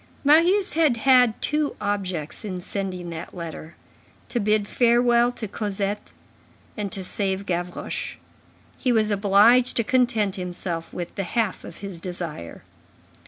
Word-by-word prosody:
Marius 340 +7 +4
had 305 -6 +3
had 250 -2 +4
two 300 -1 +1
objects 185 -7 -3
in 185 -4 -4
sending 185 -2 -4
that 165 +3 -7
letter: 165 -1 -7 0.5
to 240 - 0
bid 210 -1 +1
farewell 240 0 +3
to 225 - -5
Cosette 205 0 -3 0.6
and 205 -3 -4
to 190 - -3
save 195 +1 -2
Gavroche. 175 -1 -3 0.6
He 255 - +1
was 215 -2 +2
obliged 205 +5 +4
to 230 - +3
content 225 -5 +1
himself 175 -2 -4
with 175 -1 -6
the 195 - -3
half 215 +2 -1
of - - -10
his 180 -4 -7
desire. 170 - -6
205 Hz, 135 wpm, -24 LUFS, 180-240 Hz, 0.6 s, Marius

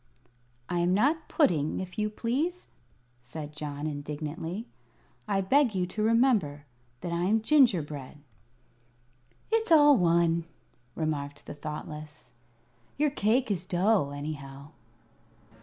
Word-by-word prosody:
"I 175 - -1
am 175 +2 +2
not 300 +9 +2
pudding, 165 - +2
if 185 +2 -6
you 215 0 +1
please," 280 +12 -2 0.5
said 145 +4 -8
John, 150 -1 -5
indignantly. 155 +6 -5 0.6
"I 200 -2 +1
beg 245 +3 +3
you 180 -1 +1
to 200 +4 -5
remember 215 - +2 0.4
that 175 - -4
I 170 +1 0
am 215 +3 +2
gingerbread." 165 - +2 1.3
"It's 450 -4 +1
all 295 -2 +8
one," 170 -3 +2 0.5
remarked 145 -3 -3
the - - -7
Thoughtless, 150 0 -8 0.7
"your 295 0 +2
cake 235 -1 +1
is 180 -3 -1
dough, 185 -2 +2
anyhow." 140 -1 -7
175 Hz, 115 wpm, -28 LUFS, 150-225 Hz, 1.3 s, all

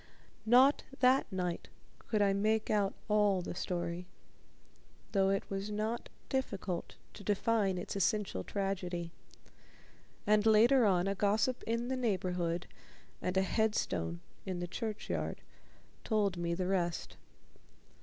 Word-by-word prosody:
Not 255 +5 +6 0.2
that 255 0 +4
night 180 -2 -2 0.4
could 215 -2 +2
I 200 -1 +3
make 215 +2 +1
out 205 -2 +1
all 205 -3 +3
the - - -4
story, 175 0 -3 1.0
though 195 -1 +3
it 195 0 0
was 195 +1 -3
not 215 +3 -2 0.2
difficult 195 -9 -3 0.2
to 205 - -11
define 205 -1 +1
its 180 - -5
essential 195 - 0
tragedy, 180 - -3 1.1
and 210 0 +4
later 230 +3 +6
on 180 -2 +3
a 195 - +1
gossip 215 +6 +1
in 230 +1 0
the 260 - -1
neighborhood 180 -7 -1 0.6
and 185 +1 -1
a 190 - +4
headstone 190 - 0 0.2
in 185 -2 -3
the 175 - -3
churchyard 215 +3 -3 0.6
told 205 -4 +1
me 170 -1 -1
the 185 +1 -2
rest. 175 -3 -1
195 Hz, 125 wpm, -33 LUFS, 180-220 Hz, 1.1 s, Not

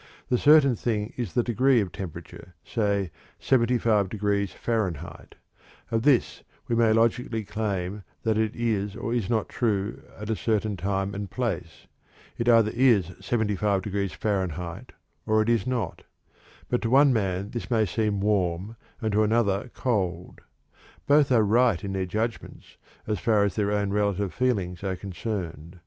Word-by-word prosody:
The 125 - +3
certain 145 -4 +6
thing 110 -1 -2
is 120 -7 -4
the 120 - +2
degree 125 +2 +3
of 100 -5 -2
temperature, 90 0 -9
say 100 -5 0 0.3
75 115 -5 +2
degrees 100 -2 -1
Fahrenheit; 110 - -3 0.6
of 115 -1 +1
this 135 -1 +2 0.3
we 120 - 0
may 115 -1 +4
logically 115 0 +1
claim 100 -2 -3 0.2
that 110 -1 +1
it 110 0 0
is 105 -4 -1
or 115 - -3
is 115 -6 -1
not 110 -3 0
true 105 -4 -1 0.2
at 105 +1 -4
a - - +1
certain 110 -1 0
time 95 +1 -2
or 100 0 -4
place. 95 -7 -4 0.5
It 120 +1 0
either 115 -2 +5
is 115 -8 +3
75 105 -2 0
degrees 100 -2 -2
Fahrenheit 90 -4 -3 0.4
or 110 0 +3
it 110 +1 +1
is 115 -1 +1
not. 125 -3 -2 0.7
But 125 - 0
to 115 - -1
one 135 +2 +6
man 100 -2 -1
this 120 - -5
may 115 -3 +3
seem 105 +1 -1
warm 100 +1 0 0.3
and 110 - 0
to 105 +1 +3
another 105 0 +1
cold; 90 -8 -2 0.6
both 145 -1 +4
are 115 -3 +5
right 115 -3 +3
in 100 -1 -3
their 95 -1 -2
judgments, 110 +5 -4 0.3
so 105 - -1
far 105 +2 +2
as 100 - 0
their 105 -2 0
own 100 -1 0
relative 100 -2 0
feelings 100 -9 -1
are 95 -1 -1
concerned. 90 -3 -5
105 Hz, 160 wpm, -26 LUFS, 95-115 Hz, 0.7 s, certain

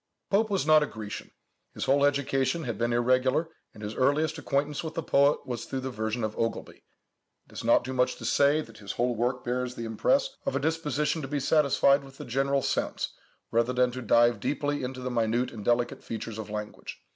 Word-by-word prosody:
Pope 215 +2 +3
was 195 -7 0
not 155 0 +6
a 150 - 0
Grecian. 110 -2 -7 0.5
His - - -3
whole 140 +1 +3
education 140 +2 +1
had 120 -3 -3
been 120 0 +1
irregular, 130 +6 +2 0.2
and 110 - -12
his 105 +1 -4
earliest 155 +5 +1
acquaintance 145 +1 -1
with 160 0 -6
the 165 - -2
poet 140 +1 +3
was 120 -2 -4
through 135 - -4
the 130 0 -4
version 110 +1 -2
of 110 -1 -2
Ogilby. 115 0 -3 0.6
It - - -20
is - - -6
not 115 +1 +4
too 130 - -4
much 125 0 +1
to - - -9
say 145 +2 +3
that 115 -6 -12
his 100 -2 -6
whole 120 +1 0
work 125 +3 -1
bears 125 0 -2
the 115 - -5
impress 115 - +1
of 275 - -2
a - - +2
disposition 155 -1 0
to 135 - -5
be 145 +1 -1
satisfied 140 -1 +3
with 135 0 -14
the - - -8
general 135 +2 +1
sense, - - -1 0.4
rather 115 +2 +2
than 125 0 +2
to 130 +1 -6
dive 120 -1 +4
deeply 145 +5 -1
into 130 0 -5
the 130 0 -3
minute 120 +1 0
and 110 -3 -8
delicate 120 +2 0
features 110 -1 -5
of 110 - -6
language. 105 0 -6
130 Hz, 215 wpm, -28 LUFS, 120-145 Hz, 0.6 s, not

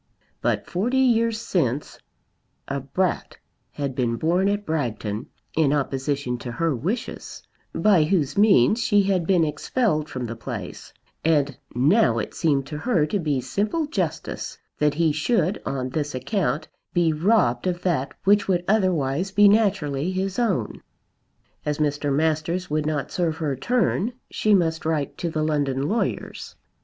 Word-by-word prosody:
But - - 0
forty 230 +9 -1
years 230 -3 +3
since 150 - -1 0.7
a 140 0 -2
brat 175 +7 -2 0.3
had 140 -2 -4
been 120 -2 0
born 175 - +1
at 205 0 -1
Bragton 115 -9 -2 0.3
in 155 -3 +3
opposition 135 -2 -1
to 120 -1 -6
her 165 +1 0
wishes, 185 - -4 0.3
by 190 -7 +4
whose 155 -5 0
means 205 - +5
she 205 -3 +3
had 185 -4 0
been 180 -4 +4
expelled 155 - 0
from 130 -1 -4
the 115 0 -5
place; 115 - -7 0.3
and 145 -4 +2 0.2
now 155 - +4
it - - -3
seemed 145 -6 +1
to 150 +1 -6
her 190 -7 +2
to 200 +6 -1
be 150 -6 0
simple 210 - -1
justice 305 - -3 0.2
that 150 -1 +2
he 165 0 +2
should 180 +4 0
on 130 -1 -2
this 145 -1 -2
account 150 - -1 0.3
be 170 -2 +3
robbed 155 - +2
of 180 -1 -2
that 155 -7 -1
which 205 +1 +4
would 180 -2 +1
otherwise 185 -5 +1
be 205 +1 +5
naturally 185 -8 +2
his 190 +3 -2
own. 195 - -1 0.8
As 150 -1 -1
Mr. 145 -1 0
Masters 160 +4 0
would 155 0 0
not 150 -3 -2
serve 165 -3 -1
her 150 -5 -1
turn 235 - 0 0.2
she 215 -1 +3
must 160 -3 +1
write 155 -3 -1
to 170 - -1
the 155 -1 -1
London 145 -3 0
lawyers. 225 +7 -3
160 Hz, 150 wpm, -24 LUFS, 140-195 Hz, 0.8 s, means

